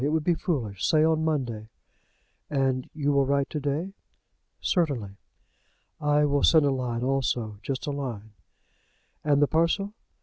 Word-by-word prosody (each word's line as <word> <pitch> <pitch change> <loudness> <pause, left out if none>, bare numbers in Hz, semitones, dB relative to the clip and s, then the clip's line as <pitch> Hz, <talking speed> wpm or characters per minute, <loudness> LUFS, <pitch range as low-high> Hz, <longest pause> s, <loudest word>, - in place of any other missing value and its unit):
It 145 - +2
would 155 0 +1
be 175 - +3
foolish. 125 - -3
Say 155 -1 +4
on 160 0 +2
Monday." 120 -9 -2 0.8
"And 135 -3 0
you 145 -2 0
will 140 -1 +2
write 140 0 +1
to 150 - -2
day?" 150 +7 -2 0.7
"Certainly." 140 - 0 0.9
"I 150 0 +3
will 145 -1 +1
send 155 0 +5
a 140 - +3
line 125 -3 -2
also, 125 -5 -1
just 130 +4 -4
a 145 - -2
line." 120 -7 -5 0.9
"And 145 -1 +3
the - - +4
parcel?" 170 +6 +1
140 Hz, 155 wpm, -27 LUFS, 130-155 Hz, 0.9 s, send